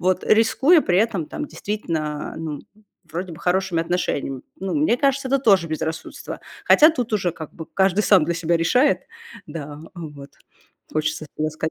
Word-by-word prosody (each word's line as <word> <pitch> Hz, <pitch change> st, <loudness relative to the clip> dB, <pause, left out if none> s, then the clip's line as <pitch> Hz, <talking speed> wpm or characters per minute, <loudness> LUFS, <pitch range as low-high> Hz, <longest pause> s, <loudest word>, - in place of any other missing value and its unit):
вот, 185 Hz, 0 st, +1 dB
рискуя 265 Hz, +9 st, +5 dB
при 180 Hz, -6 st, +2 dB
этом, 200 Hz, -7 st, +1 dB
там, 300 Hz, -, -5 dB
действительно, 160 Hz, -, -4 dB
ну, 155 Hz, -2 st, -4 dB, 0.5 s
вроде 170 Hz, +2 st, -5 dB
бы, 160 Hz, -, -10 dB
хорошими 180 Hz, 0 st, +1 dB
отношениями. 165 Hz, -6 st, -2 dB
Ну, 195 Hz, 0 st, -3 dB
мне 295 Hz, -5 st, +3 dB
кажется, 275 Hz, 0 st, +1 dB
это 275 Hz, -, +3 dB
тоже 195 Hz, -, +4 dB
безрассудство. 160 Hz, +1 st, -5 dB, 0.2 s
Хотя 310 Hz, +2 st, +7 dB
тут 250 Hz, -7 st, -3 dB
уже, 185 Hz, -4 st, +1 dB
как 160 Hz, -2 st, -9 dB
бы, 160 Hz, -, -8 dB
каждый 190 Hz, +1 st, +2 dB
сам 190 Hz, -7 st, +5 dB
для 170 Hz, +1 st, -1 dB
себя 165 Hz, 0 st, +1 dB
решает, 250 Hz, -, +3 dB, 0.4 s
да, 145 Hz, -2 st, -7 dB, 0.2 s
вот, 145 Hz, -5 st, -9 dB, 0.6 s
хочется 155 Hz, 0 st, -1 dB
и 155 Hz, -, -1 dB
ласкать. 155 Hz, +1 st, -2 dB
175 Hz, 165 wpm, -22 LUFS, 160-215 Hz, 0.6 s, Хотя